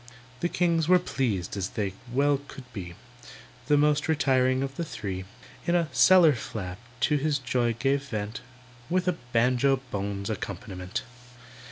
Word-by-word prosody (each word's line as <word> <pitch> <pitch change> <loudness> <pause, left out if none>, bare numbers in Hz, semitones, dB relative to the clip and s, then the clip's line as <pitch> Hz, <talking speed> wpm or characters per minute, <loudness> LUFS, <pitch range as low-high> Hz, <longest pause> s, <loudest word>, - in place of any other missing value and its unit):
The 175 - 0
kings 170 -3 +1
were 180 +1 +7
pleased 115 - -2
as 100 -1 -2
they 100 -3 -2 0.2
well 140 +2 +2
could 135 - -10
be; 90 -5 -6 0.7
The 145 -1 +4
most 150 +1 +3
retiring 130 -4 +2
of 135 0 -4
the 170 - -2
three, 95 - -5 0.4
In 170 - +3
a 170 -3 +2
"cellar 160 +6 +7
flap" 100 -6 -6 0.2
to 150 - +3
his 145 +1 +1
joy 125 -3 0
gave 135 +4 +1
vent 110 +3 -4 0.5
With 185 +1 +1
a 180 -2 +1
banjo 125 +3 +3
bones 100 0 -3
accompaniment. 90 +5 -5
130 Hz, 150 wpm, -27 LUFS, 105-150 Hz, 0.7 s, were